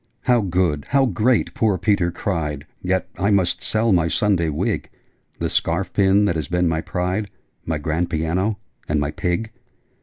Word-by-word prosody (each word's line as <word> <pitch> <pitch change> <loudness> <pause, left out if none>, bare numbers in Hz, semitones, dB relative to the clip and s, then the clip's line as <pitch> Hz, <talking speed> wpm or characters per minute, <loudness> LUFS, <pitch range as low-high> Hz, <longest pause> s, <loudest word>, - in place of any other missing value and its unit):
'How 125 -2 +3
good! 90 -6 0
How 135 0 +3
great!' 115 +2 +1
poor 105 -4 +1
Peter 100 -2 +2
cried. 80 -5 -3 0.2
'Yet 95 -1 0
I 100 - +2
must 95 -4 +2
sell 110 +1 +1
my 85 -3 +3
Sunday 90 -2 +1
wig 75 - -2 0.5
The - - -1
scarf 85 +3 0
pin 100 +1 +4
that 85 - +1
has 80 -3 -2
been 90 +1 +1
my 80 -1 0
pride 90 +4 -2 0.4
My 80 -1 0
grand 80 +3 -1
piano 90 +6 0 0.3
and 75 0 +2
my 75 +1 -1
pig!' 95 +7 -2
90 Hz, 170 wpm, -21 LUFS, 80-105 Hz, 0.5 s, pin